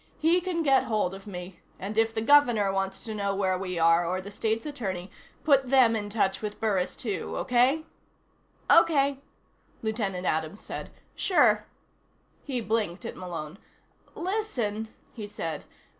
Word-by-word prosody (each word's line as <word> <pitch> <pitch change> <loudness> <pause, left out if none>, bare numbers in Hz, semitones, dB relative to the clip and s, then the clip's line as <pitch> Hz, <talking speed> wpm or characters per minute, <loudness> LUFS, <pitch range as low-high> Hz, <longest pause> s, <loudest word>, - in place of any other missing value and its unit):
"He 335 +3 +3
can 345 -2 -1
get 270 -3 +4
hold 210 -5 0
of 195 +1 -10
me 180 -2 -8 0.2
and 200 +3 -5
if 225 0 +3
the 220 0 -2
Governor 240 -7 +5
wants 195 0 -2
to 220 - -5
know 200 -1 -1
where 190 -1 +1
we 185 -1 -4
are, 165 +1 +4
or 180 +2 -1
the 195 +2 -8
State's 220 +2 -1
Attorney, 195 -11 -4 0.3
put 275 -4 +4
them 250 -4 +5
in 205 -2 -3
touch 200 -2 0
with 210 -1 -5
Burris 195 -5 0
too. 210 -6 -4
Okay?" 260 +5 +2 0.8
"Okay," 280 -5 +4 0.6
Lieutenant 205 -5 -2
Adams 160 +5 -1
said. - - -7 0.3
"Sure." 370 - +3 0.8
He 255 -4 -2
blinked 215 -5 -1
at - - -5
Malone. 175 -1 -6 0.6
"Listen," 265 - -2 0.3
he 215 -4 -6
said. 165 -7 -5
215 Hz, 150 wpm, -27 LUFS, 190-255 Hz, 0.8 s, Governor